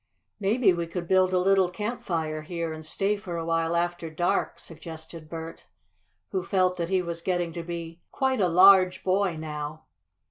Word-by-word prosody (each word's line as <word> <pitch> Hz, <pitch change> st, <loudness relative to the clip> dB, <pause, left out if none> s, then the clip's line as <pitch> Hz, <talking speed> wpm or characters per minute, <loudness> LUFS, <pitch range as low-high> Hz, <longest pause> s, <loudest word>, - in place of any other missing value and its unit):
"Maybe 205 Hz, 0 st, +3 dB
we 170 Hz, -1 st, -3 dB
could 170 Hz, 0 st, -5 dB
build 185 Hz, 0 st, +4 dB
a 185 Hz, -, +2 dB
little 190 Hz, 0 st, +3 dB
campfire 170 Hz, -7 st, -3 dB
here 165 Hz, 0 st, -4 dB
and 155 Hz, 0 st, -8 dB
stay 195 Hz, +6 st, 0 dB
for 180 Hz, -4 st, -6 dB
a 165 Hz, -, -3 dB
while 165 Hz, 0 st, 0 dB
after 175 Hz, -1 st, -1 dB
dark," 175 Hz, +3 st, 0 dB
suggested 160 Hz, -1 st, -10 dB
Bert, 165 Hz, 0 st, -8 dB, 0.6 s
who 190 Hz, -, 0 dB
felt 185 Hz, 0 st, +1 dB
that 170 Hz, -1 st, -2 dB
he 190 Hz, -1 st, +1 dB
was 170 Hz, -1 st, -5 dB
getting 175 Hz, -2 st, -1 dB
to 170 Hz, -, -4 dB
be 170 Hz, 0 st, -7 dB
quite 265 Hz, -2 st, 0 dB
a 185 Hz, -, +4 dB
large 185 Hz, +1 st, +6 dB
boy 190 Hz, -1 st, +1 dB
now. 150 Hz, 0 st, -6 dB
175 Hz, 175 wpm, -27 LUFS, 165-185 Hz, 0.6 s, large